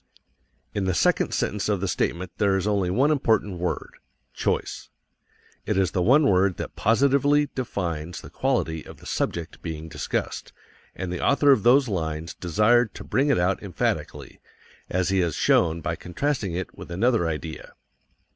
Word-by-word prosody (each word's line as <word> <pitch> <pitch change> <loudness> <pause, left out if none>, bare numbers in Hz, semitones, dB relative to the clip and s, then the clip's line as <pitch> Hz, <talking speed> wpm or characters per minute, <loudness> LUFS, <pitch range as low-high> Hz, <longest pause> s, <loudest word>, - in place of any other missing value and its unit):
In 100 -2 -1
the 95 -2 0
second - - +2
sentence 105 0 -1
of 100 -2 +1
the 100 - -2
statement 90 0 -2
there 100 -2 +3
is 95 - -2
only 100 -4 +1
one 135 +11 +3
important 110 - +1
word 90 0 -3 0.4
choice. - - -2 0.8
It - - 0
is 95 -2 +2
the 90 - 0
one 135 - +5
word 95 -1 +3
that - - -6
positively 140 +5 +3
defines 85 - -3
the - - -12
quality 80 -1 -1
of - - -12
the - - -16
subject 85 -2 -3
being 80 0 -6
discussed, - - -4 0.4
and 90 -1 -4
the 90 - -4
author 140 0 +4
of 130 - +4
those 130 +4 +5
lines 80 -4 -3
desired 110 +6 +2
to - - -8
bring 140 +3 +1
it 140 - +3
out 90 +2 +1
emphatically, 100 -4 -3 0.5
as 90 0 0
he 95 0 +2
has 85 -4 0
shown 85 0 +2
by 85 0 -2
contrasting 100 - -2
it 90 +1 -5
with - - -10
another 100 +1 +1
idea. 80 0 -5
95 Hz, 165 wpm, -25 LUFS, 85-120 Hz, 0.8 s, one